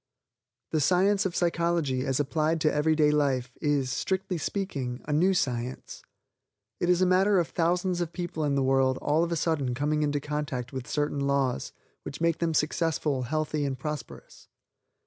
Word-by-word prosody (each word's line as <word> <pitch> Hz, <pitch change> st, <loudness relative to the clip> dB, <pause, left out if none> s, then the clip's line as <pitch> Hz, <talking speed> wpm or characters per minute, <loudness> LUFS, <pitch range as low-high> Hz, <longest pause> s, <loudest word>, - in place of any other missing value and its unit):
The 155 Hz, -, +1 dB
science 190 Hz, +6 st, +3 dB
of 175 Hz, -, -7 dB
psychology 170 Hz, -6 st, 0 dB
as 135 Hz, 0 st, 0 dB
applied 155 Hz, +3 st, 0 dB
to 155 Hz, -, +2 dB
everyday 150 Hz, 0 st, +3 dB
life 130 Hz, -4 st, 0 dB
is, 145 Hz, -4 st, +1 dB
strictly 190 Hz, +4 st, -2 dB
speaking, 140 Hz, -10 st, -3 dB
a 150 Hz, -, -1 dB
new 185 Hz, +6 st, +3 dB
science. 125 Hz, -4 st, -3 dB, 0.8 s
It 175 Hz, -, 0 dB
is 180 Hz, +1 st, +4 dB
a -, -, +4 dB
matter 190 Hz, +2 st, +4 dB
of 170 Hz, -3 st, +1 dB
thousands 175 Hz, +1 st, 0 dB
of 170 Hz, -1 st, -2 dB
people 175 Hz, -3 st, -4 dB
in 145 Hz, -2 st, +1 dB
the 135 Hz, -, +2 dB
world 130 Hz, 0 st, +2 dB
all 155 Hz, +3 st, +2 dB
of 170 Hz, -, -2 dB
a -, -, +1 dB
sudden 145 Hz, -6 st, 0 dB
coming 150 Hz, +3 st, 0 dB
in 150 Hz, -1 st, +1 dB
contact 145 Hz, -3 st, -4 dB
with 130 Hz, -2 st, -5 dB
certain 145 Hz, -1 st, -1 dB
laws, 140 Hz, -2 st, 0 dB, 0.3 s
which 145 Hz, -, -8 dB
make 165 Hz, -1 st, +1 dB
them 165 Hz, -2 st, 0 dB
successful, 150 Hz, -2 st, 0 dB
healthy 155 Hz, +3 st, -1 dB
and 135 Hz, -2 st, -2 dB
prosperous. 150 Hz, +3 st, -7 dB
150 Hz, 170 wpm, -27 LUFS, 135-170 Hz, 0.8 s, is